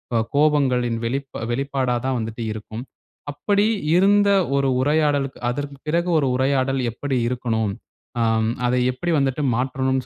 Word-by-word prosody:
அ - - +4 0.2
கோபங்களின் 135 -6 +2
வெளிப்பா-வெளிப்பாடா 130 +1 -2
தான் 130 -1 0
வந்துட்டு 115 +1 -5
இருக்கும். 110 +2 -7 0.5
அப்படி 205 +7 +1 0.3
இருந்த 200 +2 +4 0.3
ஒரு 140 0 +2
உரையாடளுக்கு, 145 -1 +1
அதற்கு 140 +3 -4
பிறகு 170 +3 0
ஒரு 145 -3 +2
உரையாடல் 135 0 +1
எப்படி 135 +3 -3
இருக்கனும்? 115 -4 -1 0.5
அ, - - +1 0.4
அதை 125 +1 +2
எப்படி 170 +7 -3
வந்துட்டு 135 +1 0
மாற்றனும்ன்னு 130 +1 -1
135 Hz, 125 wpm, -22 LUFS, 125-145 Hz, 0.5 s, அ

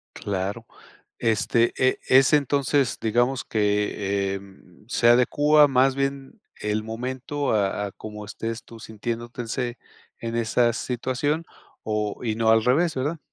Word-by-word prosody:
Claro, 100 +3 -3 0.6
este, 115 +1 +2
eh, 130 0 +2
es 135 +3 +5
entonces, 140 -2 +2
digamos 120 +4 +1
que, 100 -2 0
em, 95 -1 -12
se 120 -1 +1
adecúa 145 +5 +5
más 135 0 +3
bien 135 0 -3 0.2
el 105 +1 -1
momento 130 +5 -3
a 100 0 0
a 100 - -6
como 105 +1 -9
estés 115 +2 -5
tú 115 -1 -13
sintiéndote 115 +2 -5
ese 120 +1 -3 0.4
en 115 0 -4
esa 120 +1 +2
situación, 130 +6 -2 0.4
o 105 -1 -2
y 110 -2 0
no 110 -1 +1
al 110 0 +5
revés, 160 +6 +2
¿verdad? 145 +5 -2
120 Hz, 135 wpm, -24 LUFS, 110-130 Hz, 0.6 s, es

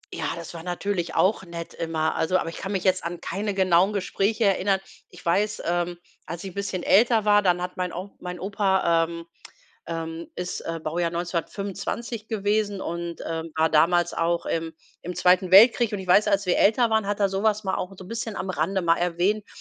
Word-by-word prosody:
Ja, - - -2
das 170 0 -8
war 165 - -7
natürlich 180 0 -3
auch 190 +1 +2
nett 170 -2 -8
immer. 160 -1 -1
Also 170 +3 +1
aber 170 - -2
ich 165 - -9
kann 195 - -5
mich 190 -3 -1
jetzt 185 -1 +2
an 170 0 -4
keine 205 0 -3
genauen 190 +1 +3
Gespräche 205 +2 0
erinnern. 195 0 +2 0.3
Ich - - -15
weiß, 205 +5 +1
ähm, 175 0 -1 0.3
als 170 +2 -6
ich 195 - -6
'n - - -19
bisschen 195 -2 -3
älter 225 +1 +4
war, 205 0 +5
dann 180 -3 +2
hat 180 0 -6
mein 180 -1 -2
onk 185 +3 -7
mein 180 -1 -6
Opa, 190 -4 +2
ähm, 170 0 -8 0.7
ähm, 165 0 -5
ist, 180 0 -4
äh, 165 0 -3
Baujahr 165 +2 -1
1925 195 +6 -4
gewesen 205 -2 0
und, 170 0 -5
ähm, 165 0 -4
war 160 0 +3
damals 175 +2 +3
auch 170 +1 0
im 165 0 -3 0.3
im 180 +1 -6
Zweiten 180 +1 +3
Weltkrieg. 230 +3 +7
Und - - -2
ich 190 - -7
weiß, 205 +4 +5
als 200 -1 +2
wir 180 - +1
älter 225 +3 +4
waren, 220 -2 +2
hat 205 0 -2
er 200 - +3
so 195 +1 -2
was 215 -1 +1
mal 190 - 0
auch 185 - -4
so 185 - -11
'n - - -13
bisschen 230 -1 -4
am 190 - -3
Rande 185 +4 -1
mal 165 -1 +3
erwähnt, 180 +5 0
185 Hz, 210 wpm, -25 LUFS, 170-200 Hz, 0.7 s, Weltkrieg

